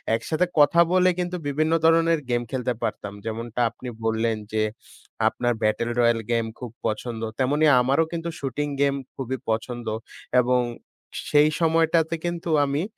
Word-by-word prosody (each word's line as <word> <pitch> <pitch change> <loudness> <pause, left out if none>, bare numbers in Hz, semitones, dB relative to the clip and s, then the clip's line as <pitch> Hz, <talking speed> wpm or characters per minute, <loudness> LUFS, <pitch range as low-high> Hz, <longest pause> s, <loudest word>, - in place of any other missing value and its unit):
একসাথে 155 +10 0
কথা 170 +4 +6
বলে 185 0 +5
কিন্তু 180 0 -2
বিভিন্ন 155 +3 +1
ধরনের 165 0 +4
গেম 120 0 +1
খেলতে 125 -1 -1
পারতাম। 100 -1 -3
যেমনটা 115 +1 -3
আপনি 125 +2 -11 0.2
বললেন 110 0 +1 0.2
যে 110 0 +2 0.6
"আপনার 120 0 0
ব্যাটেল 110 +2 +1
রয়াল 115 -1 +4
গেম 115 -1 +1
খুব 125 -3 -7
পছন্দ।" 115 +1 -3 0.2
তেমনি 145 +4 +2 0.2
আমারও 140 +6 +2
কিন্তু 170 0 -3
"শুটিং 140 +2 -2
গেম 140 -1 +3 0.2
খুবই 130 0 -3
পছন্দ।" 120 +1 -2 0.5
এবং 125 +1 +2 0.7
সেই 150 +1 +6
সময়টাতে 165 0 +2
কিন্তু 170 -1 -3 0.2
আমি 140 +3 -1
135 Hz, 145 wpm, -24 LUFS, 115-160 Hz, 0.7 s, কথা